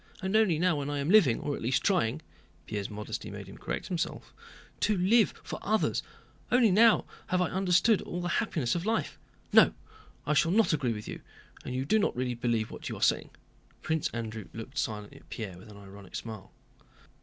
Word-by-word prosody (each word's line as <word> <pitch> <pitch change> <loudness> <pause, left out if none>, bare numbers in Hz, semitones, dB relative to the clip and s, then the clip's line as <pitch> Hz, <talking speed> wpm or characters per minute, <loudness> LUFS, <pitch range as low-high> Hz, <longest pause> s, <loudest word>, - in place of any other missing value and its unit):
And 190 +2 -1
only 215 -7 +4
now 175 -1 +2
when 140 0 -3
I 145 - -2
am 140 +4 0
living, 185 - +6
or 145 - -2
at - - -8
least 125 +3 +1
trying" 155 - +1 0.4
(Pierre's 100 -2 -4
modesty 105 0 -6
made - - -7
him - - -12
correct - - -4
himself) 175 -3 -4 0.5
"to 210 -2 +2
live 210 +5 +4
for - - -6
others, 215 +1 +1 0.5
only 245 -4 +5
now 225 +4 +5 0.2
have 180 - +1
I 180 - +1
understood 190 +3 +3
all 175 - -5
the 175 - -2
happiness 155 - -1
of 175 - -2
life. 220 +2 -1 0.3
No, - - +7 0.5
I 150 - +1
shall 165 +4 +3
not 220 -4 +4
agree 135 -6 0
with 105 -1 -7
you, - - -6 0.4
and 125 - -5
you 130 +1 -1
do 220 +9 +3
not - - +1
really 125 0 -1
believe 115 -2 -1
what - - -7
you - - -4
are - - -8
saying." - - +2 0.5
Prince 160 -1 0
Andrew 110 -2 -5
looked 130 +5 -6
silently 105 -4 -4
at - - -24
Pierre 105 -6 -6
with 110 - -14
an 105 - -12
ironic 100 -1 -12
smile. 110 -4 -7
145 Hz, 200 wpm, -29 LUFS, 115-190 Hz, 0.5 s, No